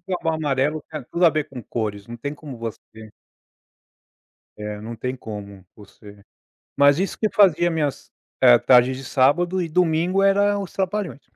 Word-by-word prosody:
Picapau 175 -3 -2
Amarelo 150 0 -1
tem 155 -3 -7
tudo 175 +1 +1
a - - +6
ver 155 -1 -2
com 130 -3 -8
cores. 105 -3 -4
Não 120 0 -8
tem 140 +5 -5
como 145 -4 -10
você 110 -1 -9 1.5
É, 105 0 -6
não 115 +2 -7
tem 125 +3 -4
como 100 -4 -9
você 105 0 -16 0.5
mas 140 0 +5
isso 190 +2 -2
que 215 - +1
fazia 175 -4 +4
minhas, 155 -4 -3 0.3
eh, 120 -2 +8
tardes 125 +1 +4
de 135 - -9
sábado 170 +9 +2
e 170 - -3
domingo 175 +3 +1
eram 200 0 +2
Os 185 - -10
Trapalhões. 190 -5 -3
145 Hz, 165 wpm, -22 LUFS, 115-175 Hz, 1.5 s, eh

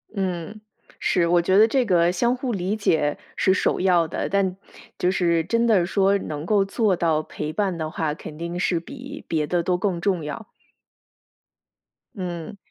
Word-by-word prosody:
嗯， 190 +1 -3 0.4
是。 175 -2 +2
我 175 0 +4
觉 185 +3 +2
得 220 +2 +7
这 255 +2 +1
个 175 -4 +3
相 235 +7 +1
互 255 0 -3
理 190 +1 -1
解 160 -8 +1 0.2
是 190 - +3
首 - - +1
要 180 -3 +3
的， - - -3
但 190 -2 +1 0.4
就 180 - +1
是 170 -3 +2
真 230 +7 +1
的 205 -7 +4
说 195 +2 +2
能 150 -5 -5
够 205 +1 +3
做 200 -1 +1
到 160 -3 +1
陪 150 0 -5
伴 195 0 0
的 160 -1 -3
话， 155 -1 -2
肯 150 0 -9
定 170 +1 -4
是 180 -1 +1
比 275 - -9
别 155 -2 0
的 175 +1 0
都 180 +1 +1
更 185 -2 -1
重 180 -4 0
要。 150 +9 -6 1.7
嗯。 180 0 -5
180 Hz, 190 characters per minute, -23 LUFS, 170-200 Hz, 1.7 s, 得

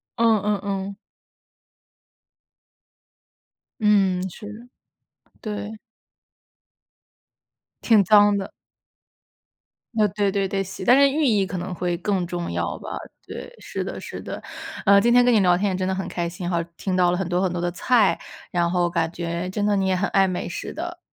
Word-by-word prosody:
嗯， 225 -3 +3
嗯， 205 -2 0
嗯。 195 0 -3 2.8
嗯， 190 -3 +3
是 210 - -11
的。 235 +3 -12 0.7
对。 210 0 -5 2.1
挺 220 -4 +5
脏 205 +1 +6
的。 195 - -5 1.4
呃， 215 -2 +3
对 200 0 0
对 195 -1 0
对， 195 +1 -1
洗 190 0 -7
但 250 +3 +6
是 280 - +7
寓 300 +2 0
意 210 -6 +3
可 185 - -5
能 180 +1 -4
会 175 0 -1
更 190 -2 -1
重 175 -1 -4
要 - - -2
吧， - - -6 0.3
对， 480 - -8
是 - - -5
的， - - -5
是 - - -7
的。 - - -7 0.4
呃， 200 -1 +6
今 240 +3 +3
天 245 0 +6
跟 245 - +4
你 220 - +5
聊 180 -2 +4
天 200 +1 0
也 - - -2
真 185 0 -1
的 190 - 0
很 190 0 -3
开 170 -1 -2
心 175 +1 -6
哈， 170 -2 0
听 190 - -3
到 180 -1 +3
了 180 - 0
很 190 -1 -2
多 180 +1 0
很 190 - +1
多 175 0 -3
的 175 - 0
菜， 215 +4 +2 0.3
然 170 -1 +1
后 175 -1 +1
感 165 -2 0
觉 170 +1 -4
真 205 +2 -2
的 205 0 +2
你 190 -1 +1
也 185 -1 +2
很 200 +3 0
爱 195 -1 +3
美 180 - -3
食 - - -6
的。 345 +3 -5
195 Hz, 190 characters per minute, -23 LUFS, 180-210 Hz, 2.8 s, 是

